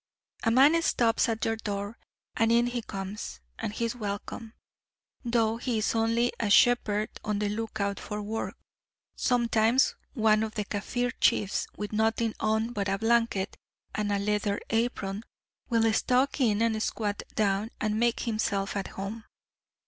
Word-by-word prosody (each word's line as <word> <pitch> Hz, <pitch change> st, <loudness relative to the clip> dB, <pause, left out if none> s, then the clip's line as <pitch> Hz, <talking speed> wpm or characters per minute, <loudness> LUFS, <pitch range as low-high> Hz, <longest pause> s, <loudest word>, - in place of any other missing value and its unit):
A 230 Hz, -, +2 dB
man 280 Hz, +8 st, +6 dB
stops 235 Hz, -8 st, +2 dB
at 225 Hz, -1 st, -1 dB
your 225 Hz, 0 st, 0 dB
door, 205 Hz, 0 st, -4 dB, 0.4 s
and 225 Hz, 0 st, +3 dB
in 235 Hz, +1 st, +4 dB
he 245 Hz, 0 st, -2 dB
comes, 195 Hz, -, -6 dB, 0.2 s
and -, -, -2 dB
he 230 Hz, +2 st, -2 dB
is 230 Hz, +1 st, -2 dB
welcome 220 Hz, +1 st, -5 dB, 0.7 s
though 230 Hz, -2 st, +1 dB
he 240 Hz, -1 st, -1 dB
is 215 Hz, -, +1 dB
only 230 Hz, +1 st, +2 dB
a 215 Hz, -, 0 dB
shepherd 215 Hz, -2 st, +4 dB
on 210 Hz, -1 st, -1 dB
the 205 Hz, 0 st, 0 dB
look 220 Hz, +1 st, -4 dB
out 200 Hz, 0 st, -1 dB
for 210 Hz, -, -5 dB
work; 215 Hz, +2 st, -4 dB, 0.6 s
sometimes 235 Hz, 0 st, +3 dB, 0.2 s
one 220 Hz, -3 st, +3 dB
of 220 Hz, -1 st, -3 dB
the 210 Hz, -, -2 dB
Kaffir 245 Hz, +5 st, -2 dB
chiefs 200 Hz, -1 st, +2 dB
with 210 Hz, 0 st, -5 dB
nothing 220 Hz, +1 st, +1 dB
on 220 Hz, +2 st, 0 dB
but 200 Hz, -2 st, -1 dB
a 195 Hz, -, +1 dB
blanket 225 Hz, -3 st, +1 dB, 0.4 s
and 210 Hz, -1 st, -1 dB
a 200 Hz, -, +2 dB
leather 205 Hz, 0 st, 0 dB
apron, 220 Hz, -3 st, -1 dB, 0.5 s
will 225 Hz, -2 st, +3 dB
stalk 255 Hz, +6 st, +2 dB
in 220 Hz, -3 st, +3 dB
and 220 Hz, -1 st, +1 dB
squat 205 Hz, -2 st, -2 dB
down 205 Hz, 0 st, +1 dB
and 215 Hz, 0 st, 0 dB
make 235 Hz, 0 st, +2 dB
himself 210 Hz, -4 st, -1 dB
at 195 Hz, -1 st, -2 dB
home. 210 Hz, +3 st, -6 dB
220 Hz, 160 wpm, -28 LUFS, 205-230 Hz, 0.7 s, man